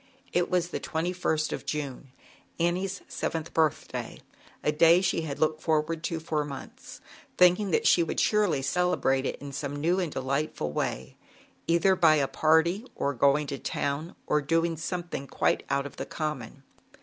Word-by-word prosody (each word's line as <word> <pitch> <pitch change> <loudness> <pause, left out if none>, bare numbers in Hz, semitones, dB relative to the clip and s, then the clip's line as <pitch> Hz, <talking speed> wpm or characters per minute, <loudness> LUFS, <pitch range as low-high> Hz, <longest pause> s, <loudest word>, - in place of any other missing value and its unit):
It 175 0 +1
was 180 -1 +1
the - - -3
2ist 160 -2 -1
of - - -5
Tune, 140 -3 -5 0.5
Annie's 185 +3 0
*j - - -23
seventh 165 0 -4
birthday, 160 -2 -1 0.4
a - - +2
day 165 +3 +6
she 180 -3 0
had 150 -3 -4
looked 155 +1 +1
forward 160 +1 0
to 165 -2 -2
for 155 -2 -1
months, 140 -2 -9 0.4
thinking 180 +3 +5
that - - +1
she 175 - +5
would 165 - -1
surely 205 -10 +2
celebrate 140 -4 +1
it - - -2
in 140 0 -8
some 140 +1 -4
new 170 +6 +1
and 175 -4 -1
delightful 135 - -2
way, 65 -3 -3 0.5
either 170 +3 +4
by 165 -4 +5
a 140 -3 +2
party, 165 - +2
or 140 - -1
going 140 +4 +3
to 140 -1 -5
town, 145 +4 -3
or 150 - +2
doing 165 +3 +1
something 170 -3 -4
quite - - +1
out 140 0 0
of 140 - -9
the - - -5
common. 140 -5 -5
155 Hz, 170 wpm, -28 LUFS, 140-175 Hz, 0.5 s, day